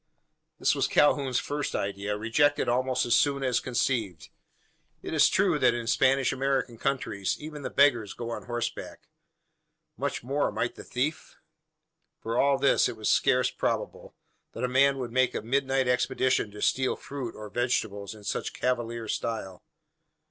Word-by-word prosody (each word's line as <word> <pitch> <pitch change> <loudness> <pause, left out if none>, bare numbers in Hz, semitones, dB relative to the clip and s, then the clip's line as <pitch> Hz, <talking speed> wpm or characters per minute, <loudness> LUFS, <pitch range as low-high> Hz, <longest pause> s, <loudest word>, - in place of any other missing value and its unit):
This - - +2
was - - +1
Calhoun's 140 -3 +3
first 145 0 -3
idea 100 +1 -2
rejected 145 +7 +2
almost 130 +1 +1
as 120 - +1
soon 140 +2 +2
as 125 -2 +2
conceived. 115 - -2 0.7
It - - -5
is - - +5
true - - +2
that 120 -2 +4
in 120 -1 -4
Spanish 135 +3 +2
American 135 -3 -1
countries 125 -8 -1
even 150 -1 -8
the - - -4
beggar 140 -5 +4
goes 120 -1 -5
on - - -6
horseback. 120 -1 -5 0.9
Much - - -3
more 140 +4 0
might 115 +1 -2
the - - -11
thief? 140 +6 -3 0.8
For 115 +1 -4
all 140 +2 +3
this, 140 0 +3
it 115 - -7
was 110 - -1
scarce 125 -1 +3
probable, - - -3 0.4
that 115 - -6
a - - +2
man 135 +2 +3
would 125 -3 -4
make 130 +1 +2
a - - -3
midnight 135 +2 +1
expedition 125 -1 +1
to 105 0 -7
steal 130 0 +1
fruit, 135 -5 -7
or 105 0 -8
vegetables, 110 -4 -2
in 105 - -14
such - - -3
cavalier 120 -2 -2
style. 100 -5 -4
125 Hz, 160 wpm, -27 LUFS, 115-135 Hz, 0.9 s, is